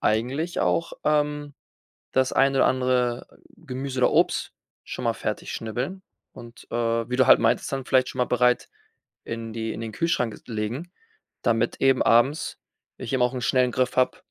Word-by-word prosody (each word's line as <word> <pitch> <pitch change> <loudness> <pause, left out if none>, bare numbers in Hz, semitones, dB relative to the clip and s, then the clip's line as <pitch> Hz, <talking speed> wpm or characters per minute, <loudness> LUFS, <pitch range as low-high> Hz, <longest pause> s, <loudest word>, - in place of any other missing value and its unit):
eigentlich 130 +10 0
auch, 170 - 0
ähm, 150 -1 0 0.6
das 130 0 +2
eine 135 0 +3
oder - - +5
andere 125 -2 0 0.3
Gemüse 135 -4 -5
oder 125 - +4
Obst - - +1 0.3
schon - - -6
mal - - +2
fertig - - -4
schnibbeln 125 - -4 0.3
und, 120 0 -12
äh, - - -3 0.3
wie 125 - -1
du 130 0 +4
halt - - +8
meintest, - - +1
dann 135 -1 -3
vielleicht 130 -1 +3
schon 130 - -7
mal 125 - +3
bereit 125 0 +2 0.6
in 115 -1 -5
die 110 -1 -3
in 115 - -7
den 110 -1 -5
Kühlschrank 125 -10 0
legen, 120 +10 -4 0.5
damit 115 0 0
eben 135 -1 +4
abends 125 +6 +2 0.4
ich 115 - -5
eben 130 - +1
auch 125 +1 +1
'n 125 - -4
schnellen 125 0 +2
Griff 130 +1 0
habe 130 - +2
130 Hz, 170 wpm, -25 LUFS, 120-135 Hz, 0.6 s, halt